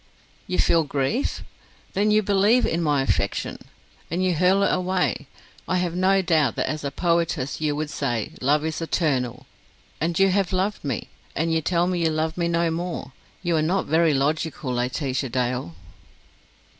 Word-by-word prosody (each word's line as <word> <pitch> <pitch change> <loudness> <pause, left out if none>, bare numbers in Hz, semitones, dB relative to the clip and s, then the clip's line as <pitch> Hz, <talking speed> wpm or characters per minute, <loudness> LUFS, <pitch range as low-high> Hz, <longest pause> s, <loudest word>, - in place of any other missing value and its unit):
"You 180 - -2
feel 165 -1 +4
grief? 145 - -1 0.5
Then 205 +2 +2
you 215 0 +4
believe 205 +5 +3
in 165 - 0
my 145 -4 +2
affection, - - -1 0.5
and 175 +3 -1
you 185 -1 +2
hurl 185 +4 +3
it - - +2
away. 185 0 0 0.4
I 185 - +1
have 180 -2 -1
no 190 +1 +3
doubt 155 -8 +2
that - - -1
as 155 -1 -3
a 140 - -1
poetess 165 -3 0
you 150 -1 0
would 150 0 -3
say, 120 -6 -2
love 145 +4 +2
is 160 0 -3
eternal. 130 -7 -1 0.5
And 165 +1 -1
you 195 0 +5
have 195 0 +1
loved 195 +3 -1
me. 135 -6 -3 0.3
And 165 +2 0
you 160 - +2
tell 170 +2 +1
me 180 -1 0
you 165 - +3
love 160 0 -1
me 170 -1 0
no 170 -1 +1
more. 170 -4 -4 0.3
You 175 -2 +1
are - - +2
not 180 +5 +1
very 160 0 +3
logical, 145 -1 -1
Laetitia 130 +2 -1
Dale." 125 -7 -2
165 Hz, 175 wpm, -24 LUFS, 145-180 Hz, 0.5 s, you